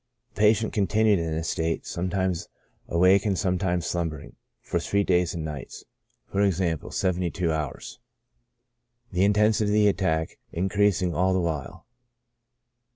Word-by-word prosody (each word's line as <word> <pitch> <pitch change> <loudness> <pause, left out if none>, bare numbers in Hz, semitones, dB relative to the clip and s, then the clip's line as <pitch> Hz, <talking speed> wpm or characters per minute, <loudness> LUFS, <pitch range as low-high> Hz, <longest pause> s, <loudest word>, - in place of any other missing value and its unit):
The - - -12
patient 110 +1 +3
continued 105 0 +2
in 80 -1 -2
this 80 +1 -2
state, 80 0 -2
sometimes 90 0 -2 0.4
awake 90 +3 +4
and 100 -3 0
sometimes 90 -2 0
slumbering, 80 -4 -4 0.2
for - - -2
three 100 0 0
days 90 -2 +1
and 80 -2 -4
nights, 75 -5 -7 0.2
(/. - - -35
^., 95 -5 0
72 90 -2 0
hours,) 75 -3 -5 1.1
the 90 0 +1
intensity 105 +1 +3
of - - +1
the 105 0 +4
attack 80 -5 0
increasing 95 0 +1
all 95 +2 +2
the 95 - +2
while. 80 -6 -4
90 Hz, 135 wpm, -26 LUFS, 85-100 Hz, 1.1 s, awake